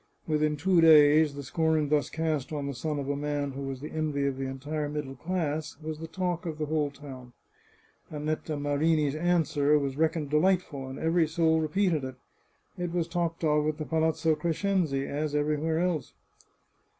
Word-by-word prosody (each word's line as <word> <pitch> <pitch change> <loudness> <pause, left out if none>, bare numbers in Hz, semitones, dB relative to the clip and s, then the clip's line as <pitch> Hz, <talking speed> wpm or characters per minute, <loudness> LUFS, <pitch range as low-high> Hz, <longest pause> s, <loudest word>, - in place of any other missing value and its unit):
Within 150 -1 +1
two 185 +2 +3
days 150 -1 +6
the 140 - -6
scorn 160 +1 +1
thus 145 -3 +1
cast 155 -4 -2
on 145 -2 -3
the 140 - -3
son 150 +4 -3
of 140 -1 -3
a 145 - 0
man 145 0 -2
who 135 +1 -7
was 135 -1 -5
the 150 - -7
envy 150 -3 -1
of 140 -1 0
the 135 0 -3
entire 145 +3 -4
middle 145 -2 -4
class 160 0 -3
was 155 -1 -6
the 165 - -6
talk 175 0 -2
of 155 -2 -4
the 155 - -2
whole 150 -1 0
town. 130 -4 -11 0.8
Annetta 155 0 -3
Marini's 145 +1 +1
answer 155 -3 +2
was 140 -2 -2
reckoned 160 -2 0
delightful, 150 -4 +1
and 130 +1 -7
every 165 0 +2
soul 160 0 +2
repeated 160 -1 +1
it.. 130 0 -5 0.6
It 175 -1 -2
was 170 -2 -1
talked 170 -1 -2
of 150 -1 +2
at 155 -1 -1
the 155 - -4
Palazzo 160 0 +1
Crescenzi, 165 -4 0
as 150 +1 -2
everywhere 150 +2 0
else. 170 -6 -1
155 Hz, 180 wpm, -28 LUFS, 145-160 Hz, 0.8 s, days